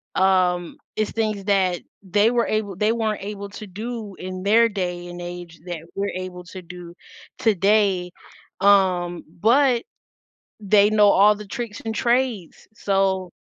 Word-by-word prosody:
um 180 Hz, -2 st, +2 dB, 0.2 s
it's 215 Hz, -, -1 dB
things 215 Hz, -3 st, -2 dB
that 190 Hz, -3 st, +2 dB, 0.2 s
they 205 Hz, +4 st, +2 dB
were 240 Hz, -1 st, +1 dB
able 215 Hz, -3 st, -2 dB
they 210 Hz, +4 st, +1 dB
weren't 220 Hz, -3 st, -1 dB
able 200 Hz, 0 st, -6 dB
to 205 Hz, +1 st, -9 dB
do 215 Hz, +1 st, -6 dB
in 185 Hz, 0 st, -6 dB
their 220 Hz, +4 st, +4 dB
day 180 Hz, -4 st, -4 dB
and 175 Hz, 0 st, -8 dB
age 175 Hz, -1 st, -8 dB
that 175 Hz, -2 st, -4 dB
we're 200 Hz, +1 st, -2 dB
able 185 Hz, -1 st, -6 dB
to 185 Hz, +1 st, -9 dB
do 175 Hz, 0 st, -11 dB, 0.4 s
today, 200 Hz, -5 st, +2 dB, 0.5 s
um, 185 Hz, -3 st, +3 dB, 0.2 s
but 245 Hz, +3 st, +3 dB, 0.8 s
they 205 Hz, 0 st, +4 dB
know 210 Hz, -1 st, +5 dB
all 205 Hz, +2 st, +5 dB
the 210 Hz, 0 st, -10 dB
tricks 230 Hz, 0 st, -6 dB
and 220 Hz, 0 st, -3 dB
trades, 235 Hz, -6 st, -1 dB
so 195 Hz, -3 st, 0 dB
200 Hz, 145 wpm, -22 LUFS, 180-215 Hz, 0.8 s, know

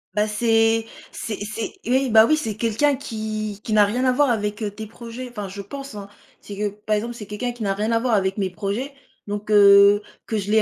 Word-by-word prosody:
Bah, 210 Hz, 0 st, +2 dB
c'est 225 Hz, +1 st, +2 dB, 0.3 s
c'est 220 Hz, -2 st, -5 dB
c'est 215 Hz, +2 st, -5 dB
oui, 260 Hz, 0 st, +2 dB
bah 220 Hz, 0 st, +8 dB
oui! 310 Hz, -, +3 dB
C'est 220 Hz, -9 st, -3 dB
quelqu'un 230 Hz, +6 st, +1 dB
qui 215 Hz, -5 st, -5 dB
qui 220 Hz, -, -3 dB
n'a 210 Hz, -, +6 dB
rien 235 Hz, +6 st, 0 dB
à 255 Hz, -, +4 dB
voir 280 Hz, +2 st, +3 dB
avec, 210 Hz, -1 st, -1 dB
heu, 210 Hz, -, -1 dB
tes 215 Hz, +2 st, -8 dB
projets. 235 Hz, +3 st, -8 dB
Enfin, 210 Hz, -5 st, -6 dB
je 200 Hz, +1 st, -7 dB
pense, 275 Hz, +4 st, -8 dB
hein. 200 Hz, -1 st, -7 dB, 0.3 s
C'est 205 Hz, -, -9 dB
que 205 Hz, +1 st, -1 dB
par 210 Hz, +1 st, -2 dB
exemple, 235 Hz, +3 st, -3 dB
c'est 215 Hz, -, -8 dB
quelqu'un 210 Hz, +5 st, -4 dB
qui 240 Hz, -2 st, -7 dB
n'a 195 Hz, -1 st, +1 dB
rien 215 Hz, +3 st, -1 dB
à 230 Hz, -, +3 dB
voir 245 Hz, -1 st, 0 dB
avec 190 Hz, -1 st, +1 dB
mes 190 Hz, -2 st, -1 dB
projets, 210 Hz, +9 st, -4 dB, 0.3 s
donc 205 Hz, +1 st, -5 dB
heu, 200 Hz, 0 st, +7 dB, 0.2 s
que 220 Hz, -, -1 dB
je 200 Hz, 0 st, -3 dB
les 220 Hz, 0 st, +5 dB
215 Hz, 240 wpm, -22 LUFS, 205-235 Hz, 0.3 s, bah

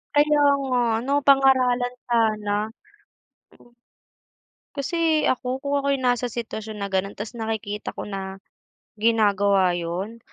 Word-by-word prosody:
Kaya 295 Hz, 0 st, +4 dB, 0.2 s
nga 255 Hz, -2 st, +1 dB, 0.2 s
ano, 270 Hz, +4 st, -2 dB
pangaralan 255 Hz, -3 st, +4 dB
sana. 220 Hz, -3 st, +1 dB, 2.2 s
Kasi 320 Hz, +2 st, +1 dB
ako, 255 Hz, +1 st, -2 dB
kung 280 Hz, 0 st, -3 dB
ako 280 Hz, -, -3 dB
yung 260 Hz, -2 st, -2 dB
nasa 245 Hz, 0 st, 0 dB
sitwasyon 220 Hz, -3 st, -6 dB
na 200 Hz, -, -3 dB
gano'n, 195 Hz, +1 st, -1 dB
tas 225 Hz, +3 st, -8 dB
nakikita 215 Hz, -2 st, -4 dB
ko -, -, -7 dB
na 195 Hz, -1 st, -6 dB, 0.6 s
ginagawa 205 Hz, -4 st, +3 dB
'yon, 175 Hz, +6 st, -4 dB
230 Hz, 115 wpm, -23 LUFS, 205-260 Hz, 2.2 s, Kaya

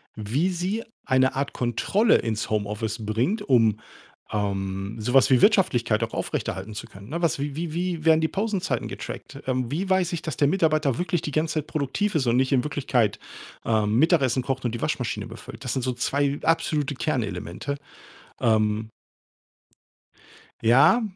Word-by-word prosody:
wie 120 Hz, -, 0 dB
sie 185 Hz, +5 st, -2 dB, 0.2 s
eine 130 Hz, 0 st, +3 dB
Art 135 Hz, +1 st, -2 dB
Kontrolle 190 Hz, -, +2 dB
ins 110 Hz, -2 st, -2 dB
Homeoffice 110 Hz, +1 st, -2 dB
bringt, 120 Hz, -, 0 dB
um, 115 Hz, -5 st, +3 dB, 0.5 s
ähm, 100 Hz, 0 st, -2 dB
so 110 Hz, +3 st, -2 dB
was 135 Hz, 0 st, +6 dB
wie 130 Hz, -2 st, +5 dB
Wirtschaftlichkeit 120 Hz, -, +3 dB
auch 115 Hz, -, -4 dB
aufrechterhalten 95 Hz, +3 st, -3 dB
zu 105 Hz, -, -7 dB
können, 100 Hz, +2 st, -13 dB
ne? 170 Hz, +4 st, -3 dB
Was 170 Hz, -3 st, +1 dB
wie 140 Hz, 0 st, -3 dB, 0.2 s
wie 175 Hz, -2 st, -2 dB
werden 160 Hz, 0 st, +5 dB
die 160 Hz, -, +2 dB
Pausenzeiten 190 Hz, -, -1 dB
getrackt? -, -, -7 dB
Ähm, 130 Hz, -2 st, 0 dB
wie 180 Hz, +7 st, -1 dB
weiß 185 Hz, -2 st, +2 dB
ich, 170 Hz, -, -2 dB
dass 155 Hz, -6 st, -4 dB
der 145 Hz, -, +4 dB
Mitarbeiter 155 Hz, -6 st, +2 dB
wirklich 175 Hz, -2 st, -1 dB
die 150 Hz, -, -4 dB
ganze 155 Hz, +3 st, 0 dB
Zeit 155 Hz, -1 st, -2 dB
produktiv 155 Hz, +7 st, -1 dB
ist 145 Hz, -4 st, +2 dB
und 120 Hz, +1 st, +3 dB
nicht 130 Hz, 0 st, +2 dB
in 130 Hz, -3 st, +3 dB
Wirklichkeit, 130 Hz, -7 st, 0 dB, 0.5 s
ähm, 110 Hz, -1 st, +1 dB
Mittagessen 140 Hz, -6 st, +3 dB
kocht 130 Hz, 0 st, -3 dB
und 120 Hz, -, -1 dB
die 120 Hz, -, -4 dB
Waschmaschine -, -, -2 dB
befüllt? 115 Hz, +4 st, -10 dB
Das 125 Hz, -, -2 dB
sind 130 Hz, -, -2 dB
so 130 Hz, 0 st, 0 dB
2 140 Hz, +3 st, 0 dB
absolute 150 Hz, -3 st, +1 dB
Kernelemente. 115 Hz, +1 st, -3 dB, 0.6 s
Ähm 110 Hz, -1 st, +1 dB, 1.7 s
Ja, 130 Hz, -, +6 dB
130 Hz, 165 wpm, -25 LUFS, 110-160 Hz, 1.7 s, was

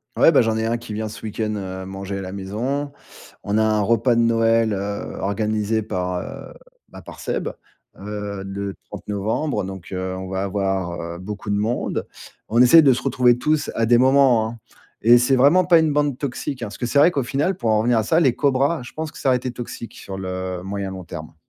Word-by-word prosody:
Ouais, -, -, +6 dB
ben, -, -, +5 dB
j'en 110 Hz, -1 st, 0 dB
ai 110 Hz, -, -1 dB
un 115 Hz, -, 0 dB
qui 115 Hz, -2 st, -8 dB
vient 110 Hz, +1 st, -3 dB
ce 110 Hz, -, -10 dB
week-end, 110 Hz, 0 st, -3 dB
heu, 95 Hz, -1 st, -5 dB
manger 95 Hz, 0 st, -5 dB
à -, -, -5 dB
la 95 Hz, -1 st, -6 dB
maison. 120 Hz, +9 st, -3 dB, 0.5 s
On 100 Hz, +1 st, 0 dB
a 110 Hz, -, +3 dB
un 110 Hz, -1 st, +2 dB
repas 115 Hz, +3 st, +2 dB
de 115 Hz, -, +2 dB
Noël, 115 Hz, -1 st, +3 dB
heu, 100 Hz, +1 st, -4 dB
organisé 110 Hz, +1 st, 0 dB
par, 90 Hz, -3 st, -3 dB
heu, -, -, -8 dB, 0.4 s
bah, -, -, -11 dB
par -, -, -12 dB
Seb. -, -, -2 dB, 0.5 s
Heu, 100 Hz, -1 st, -5 dB
le 100 Hz, 0 st, -5 dB
30 -, -, -10 dB
novembre, 105 Hz, +9 st, -1 dB
donc, 95 Hz, -1 st, -7 dB
heu, 95 Hz, 0 st, -3 dB
on 95 Hz, 0 st, -6 dB
va 95 Hz, 0 st, -2 dB
avoir, 95 Hz, -3 st, -2 dB
heu, 85 Hz, 0 st, -6 dB
beaucoup 100 Hz, +2 st, -7 dB
de 100 Hz, -, +1 dB
monde. 110 Hz, +4 st, -1 dB, 0.4 s
On 120 Hz, +3 st, +3 dB
essaie 160 Hz, +6 st, +8 dB
de 135 Hz, -3 st, +6 dB
se 130 Hz, -, -3 dB
retrouver 125 Hz, -1 st, +3 dB
tous 155 Hz, +2 st, 0 dB
à 115 Hz, -1 st, 0 dB
des 120 Hz, -, +5 dB
moments, 130 Hz, -3 st, +4 dB
hein. 115 Hz, -, -10 dB, 0.4 s
Et 120 Hz, +2 st, +7 dB
c'est 125 Hz, +3 st, +3 dB
vraiment 145 Hz, +8 st, +5 dB
pas 170 Hz, -2 st, +6 dB
une 160 Hz, -1 st, +2 dB
bande 145 Hz, -2 st, +1 dB
toxique, 140 Hz, -1 st, -4 dB
hein. 115 Hz, -, -3 dB
Parce 100 Hz, -, -9 dB
que 125 Hz, -, -3 dB
c'est 140 Hz, +4 st, +2 dB
vrai 150 Hz, -, +7 dB
qu'au 140 Hz, -5 st, -1 dB
final 145 Hz, +9 st, -1 dB
pour 115 Hz, -10 st, 0 dB
en 110 Hz, -, +3 dB
revenir 120 Hz, +1 st, +2 dB
à 110 Hz, -, +2 dB
ça, 160 Hz, +10 st, +2 dB
les 135 Hz, -8 st, +3 dB
cobras, 140 Hz, +2 st, +1 dB
je 120 Hz, -, -11 dB
pense 155 Hz, -1 st, -5 dB
que -, -, -14 dB
ça 135 Hz, -, 0 dB
aurait 125 Hz, -, +4 dB
été 125 Hz, 0 st, -4 dB
toxique 120 Hz, -1 st, -8 dB
sur 95 Hz, -1 st, -8 dB
le 95 Hz, -1 st, -4 dB
moyen, 100 Hz, 0 st, -4 dB
long 95 Hz, -1 st, -7 dB
terme. 80 Hz, -2 st, -9 dB
110 Hz, 230 wpm, -22 LUFS, 100-125 Hz, 0.5 s, essaie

